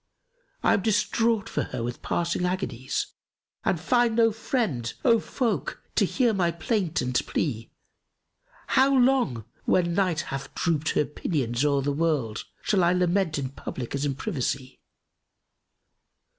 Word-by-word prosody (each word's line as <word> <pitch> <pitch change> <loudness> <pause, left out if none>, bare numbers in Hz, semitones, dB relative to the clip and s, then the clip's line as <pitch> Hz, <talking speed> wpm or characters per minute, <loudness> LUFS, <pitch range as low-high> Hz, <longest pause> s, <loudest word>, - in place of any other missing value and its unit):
I - - +5
am 200 - +2
distraught 220 +1 +1
for - - -1
her 125 -2 -4
with 120 +1 -4
passing 170 +1 -1
agonies 180 -9 -2 0.2
* - - -67
And 175 - +1
find 240 +5 +2
no 225 -1 +5
friend, 210 - -1
O 230 -3 +6
folk! 255 - -2
to - - +3
hear 240 -4 +2
my 180 -4 +2
plaint 175 - -1
and 125 0 -2
plea. 115 -7 -2 1.0
How 270 +1 +4
long, 245 - +2 0.2
when 175 -2 +2
Night 180 -3 +1
hath 135 0 -6
drooped 160 -3 0
her 150 - +2
pinions 135 -5 -1
o'er 140 -2 +2
the 145 - 0
world, 145 -8 0
* - - -38
Shall 195 -4 +2
I 175 +1 +4
lament 180 -2 +1
in 135 -2 -2
public 130 -2 -6
as 140 0 -1
in 140 -2 0
privacy? 135 - -3
170 Hz, 150 wpm, -26 LUFS, 135-215 Hz, 1.0 s, O